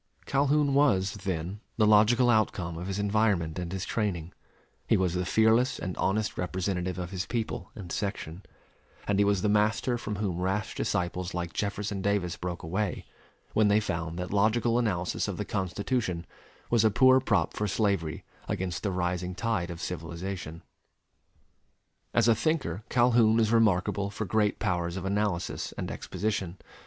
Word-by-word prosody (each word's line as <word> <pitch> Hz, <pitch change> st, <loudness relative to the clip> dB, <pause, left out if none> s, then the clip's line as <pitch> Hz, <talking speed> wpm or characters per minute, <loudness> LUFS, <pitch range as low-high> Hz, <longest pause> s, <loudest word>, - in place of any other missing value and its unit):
Calhoun 140 Hz, +1 st, +2 dB
was, 100 Hz, -10 st, +3 dB
then, 95 Hz, -1 st, -4 dB, 0.2 s
the 110 Hz, -, +4 dB
logical 110 Hz, +4 st, +5 dB
outcome 95 Hz, -6 st, +1 dB
of 90 Hz, +3 st, -5 dB
his 95 Hz, 0 st, -2 dB
environment 100 Hz, -6 st, +1 dB
and 90 Hz, -1 st, -4 dB
his 95 Hz, 0 st, -3 dB
training; 90 Hz, -7 st, -2 dB, 0.5 s
he -, -, +4 dB
was 90 Hz, -2 st, +1 dB
the 90 Hz, 0 st, -1 dB
fearless 110 Hz, +3 st, +3 dB
and 90 Hz, 0 st, -4 dB
honest 105 Hz, +2 st, 0 dB
representative 90 Hz, 0 st, -2 dB
of 90 Hz, -1 st, -5 dB
his 95 Hz, -1 st, -3 dB
people 115 Hz, -2 st, -3 dB
and 95 Hz, -7 st, -8 dB
section; 95 Hz, -4 st, -4 dB, 0.7 s
and 100 Hz, -1 st, +1 dB
he -, -, +6 dB
was 100 Hz, -2 st, +1 dB
the -, -, +3 dB
master 110 Hz, +4 st, +2 dB
from 105 Hz, -2 st, -4 dB
whom 95 Hz, -4 st, -2 dB
rash 95 Hz, +2 st, -1 dB
disciples 90 Hz, +1 st, -2 dB
like 85 Hz, -1 st, -3 dB
Jefferson 100 Hz, -1 st, -2 dB
Davis 95 Hz, -3 st, 0 dB
broke 90 Hz, -1 st, -5 dB
away, 95 Hz, +4 st, -2 dB, 0.5 s
when 110 Hz, -1 st, +4 dB
they 105 Hz, +1 st, +4 dB
found 85 Hz, -5 st, -3 dB
that 90 Hz, +2 st, -4 dB
logical 115 Hz, +3 st, +2 dB
analysis 95 Hz, -7 st, -1 dB
of -, -, -4 dB
the -, -, -3 dB
Constitution 95 Hz, -1 st, -2 dB, 0.5 s
was 115 Hz, -2 st, +4 dB
a 110 Hz, -, +5 dB
poor 130 Hz, +4 st, +6 dB
prop 105 Hz, -10 st, +1 dB
for 105 Hz, -, -1 dB
slavery 100 Hz, -6 st, 0 dB, 0.2 s
against 90 Hz, -2 st, -2 dB
the 105 Hz, -, -1 dB
rising 90 Hz, 0 st, -2 dB
tide 100 Hz, -4 st, -1 dB
of 85 Hz, -1 st, -6 dB
civilization. 85 Hz, +1 st, -5 dB, 1.5 s
As 115 Hz, -1 st, +3 dB
a 115 Hz, -, +7 dB
thinker 110 Hz, -, -1 dB
Calhoun 120 Hz, -2 st, +4 dB
is 110 Hz, -1 st, +2 dB
remarkable 100 Hz, -3 st, +2 dB
for 105 Hz, +2 st, -4 dB
great 105 Hz, 0 st, +1 dB
powers 90 Hz, -3 st, -1 dB
of 95 Hz, -, -5 dB
analysis 100 Hz, -2 st, -1 dB
and -, -, -4 dB
exposition. 95 Hz, -2 st, -3 dB
100 Hz, 160 wpm, -28 LUFS, 90-110 Hz, 1.5 s, a